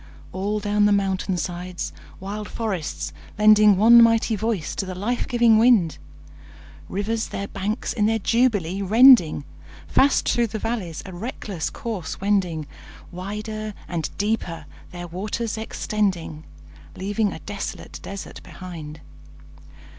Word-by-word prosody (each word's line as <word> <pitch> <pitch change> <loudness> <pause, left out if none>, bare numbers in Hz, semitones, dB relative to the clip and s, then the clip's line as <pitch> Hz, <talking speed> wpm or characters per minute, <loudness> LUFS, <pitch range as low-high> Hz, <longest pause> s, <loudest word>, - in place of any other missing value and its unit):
All 205 +3 -2
down 205 0 +2
the - - +2
mountain 195 -2 0
sides 180 +1 -4 0.3
wild 205 +2 -6
forests 195 -9 -3 0.2
lending 210 -1 +6
One 235 +4 +8
mighty 230 -1 +4
voice 215 -6 -2
to - - -1
the 185 - -5
life 230 +6 -2
giving 235 -2 +4
wind, 220 -9 +4 0.9
Rivers 220 +3 -2
their 200 - -5
banks 200 +4 -3
in 210 -2 +2
their 225 0 +2
jubilee 205 -5 +1
rending, 215 - +6 0.4
Fast 275 - +3
through 235 -1 +2
the 220 - -5
valleys 205 -8 -4
a 190 - -8
reckless 195 -3 -4
course 210 -8 -5
wending, 185 -6 0 0.5
Wider 210 +3 -5
and 165 -3 -3
deeper 190 -7 -2 0.2
their 175 0 -7
waters 210 +6 -3
extending, 195 -7 -2 0.5
Leaving 205 +2 -1
a - - -6
desolate 205 -1 -6
desert 200 0 -8
behind. 160 -4 -9
205 Hz, 125 wpm, -23 LUFS, 180-220 Hz, 0.9 s, One